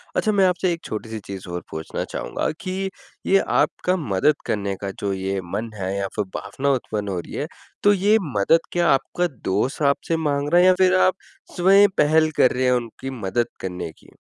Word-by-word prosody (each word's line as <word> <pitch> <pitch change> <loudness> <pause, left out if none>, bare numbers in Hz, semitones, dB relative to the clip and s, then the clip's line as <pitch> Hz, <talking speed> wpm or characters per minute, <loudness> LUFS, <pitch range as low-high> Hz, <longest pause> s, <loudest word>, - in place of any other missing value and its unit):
अच्छा 215 - +2
मैं 195 -2 +4
आपसे 180 0 +1
एक 170 - -8
छोटी-सी 110 +1 -5
चीज़ 95 -1 -7
और 90 0 -4
पूछना 80 0 -4
चाहूँगा - - -3
कि 190 +1 -3 0.4
ये 195 - +5 0.2
आपका 180 - +1
मदद 140 - +2
करने 100 -2 -1
का 100 - -3
जो 100 -1 -1
ये 95 0 -2
मन 110 +3 -3
है 95 -1 -3
या 100 0 -1
फिर 105 - -1
भावना 130 +8 -2
उत्पन्न 110 -5 -2
हो 95 -2 -2
रही - - -9
है, - - -3 0.4
तो 205 - +6
ये 205 +3 +4 0.2
मदद 100 +12 +4
क्या 175 -1 +2
आपका 175 +6 0 0.2
दोस्त 125 +10 0
आपसे 165 +3 -2
माँग 145 -2 -1
रहा 175 - +7
है - - +5
या 185 - +7
फिर 185 0 +5
आप 185 - +4 0.4
स्वयं 195 +3 +6
पहल 155 +1 +4
कर 130 - +5
रहे 130 +1 0
हैं 125 - +4
उनकी 125 +1 -2
मदद 115 +5 0
करने 90 -3 -5
की? - - -21
130 Hz, 200 wpm, -22 LUFS, -, 0.4 s, रहा